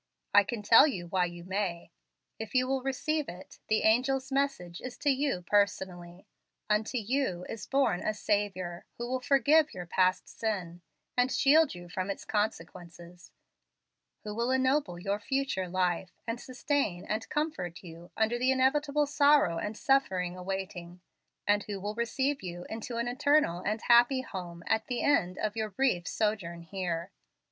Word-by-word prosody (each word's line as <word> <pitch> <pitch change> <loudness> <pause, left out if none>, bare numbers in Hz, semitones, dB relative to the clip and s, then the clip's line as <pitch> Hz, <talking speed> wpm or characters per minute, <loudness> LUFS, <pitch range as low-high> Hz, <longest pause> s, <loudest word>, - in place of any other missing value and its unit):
I 205 0 +8
can 210 +1 -5
tell 225 +8 +8
you 185 - -3
why 180 +1 +1
you 175 -1 -8
may. 185 -3 -3 0.5
If 220 +3 -7
you 255 0 +3
will 265 0 0
receive 280 +3 -1
it, 180 +2 -11
the 215 - +2
angel's 260 +4 +2
message 270 -11 -1
is 255 -1 -7
to 290 - +2
you 270 -9 -1
personally; 185 -3 -1 0.4
unto 215 +4 0
you 220 -6 -1
is 225 - -7
born 265 -10 +2
a 215 - -1
Saviour 195 -5 -2
who 240 - -4
will 255 +1 -1
forgive 285 +3 +3
your 180 -1 -6
past 185 +1 +1
sin, 180 -6 -4 0.3
and 250 +1 +2
shield 290 - +4
you 175 0 -10
from 185 +2 -4
its 200 - -5
consequences, 175 -4 -4 0.9
who 210 - -5
will 235 +3 -1
ennoble 260 -7 +1
your 200 +3 -2
future 265 -6 -1
life, 180 0 0 0.2
and 230 +1 -4
sustain 255 -8 -1
and 215 +1 -3
comfort 295 - -3
you 170 0 -11
under 225 +2 +1
the 255 +1 +2
inevitable 285 +3 +2
sorrow 285 - +4
and 210 +1 -4
suffering 190 -11 +1
awaiting, 185 -1 -5 0.5
and 205 0 +2
who 205 -2 -5
will 205 +2 -4
receive 265 +5 -1
you 175 -1 -6
into 225 +2 -5
an 235 +1 -1
eternal 270 - +2
and 215 +2 -1
a - - -11
happy 240 +2 +5
home 175 -8 -7
at 220 0 0
the 245 -2 -2
end 185 -11 +2
of 215 0 -2
your 220 -1 -2
brief 195 -5 0
sojourn 195 -6 -2
here. 175 0 -4
210 Hz, 165 wpm, -30 LUFS, 180-260 Hz, 0.9 s, I